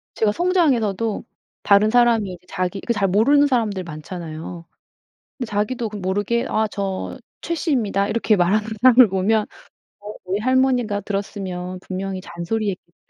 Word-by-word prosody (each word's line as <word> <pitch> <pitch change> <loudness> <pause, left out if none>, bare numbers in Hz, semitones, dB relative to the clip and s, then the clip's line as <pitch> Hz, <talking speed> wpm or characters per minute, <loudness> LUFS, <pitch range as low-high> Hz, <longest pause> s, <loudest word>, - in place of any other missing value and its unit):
제가 215 -2 +2
성장해서도 230 - +1 0.4
다른 205 +1 +5
사람이 230 -4 +3
이제 180 0 -14
자기 185 +1 -3
그 235 - -1
잘 200 -3 +1
모르는 275 +10 +4
사람들 220 -8 0
많잖아요. 165 +1 -8 0.7
근데 250 - -3
자기도 215 +3 -1
그 210 - -7
모르게 205 +5 -1
"아 220 0 +1
저 195 -2 -4 0.2
최 335 - -2
씨입니다." 225 - 0
이렇게 220 0 +2
말하는 200 +4 +2 0.2
사람을 255 -2 +7
보면 200 +3 +2 0.6
'어 210 +1 -8
우리 190 +2 -1
할머니가 250 -3 +1
들었으면 190 -3 -4
분명히 190 0 -4
잔소리했겠다.' 185 0 -4
205 Hz, 345 characters per minute, -21 LUFS, 190-235 Hz, 0.7 s, 사람을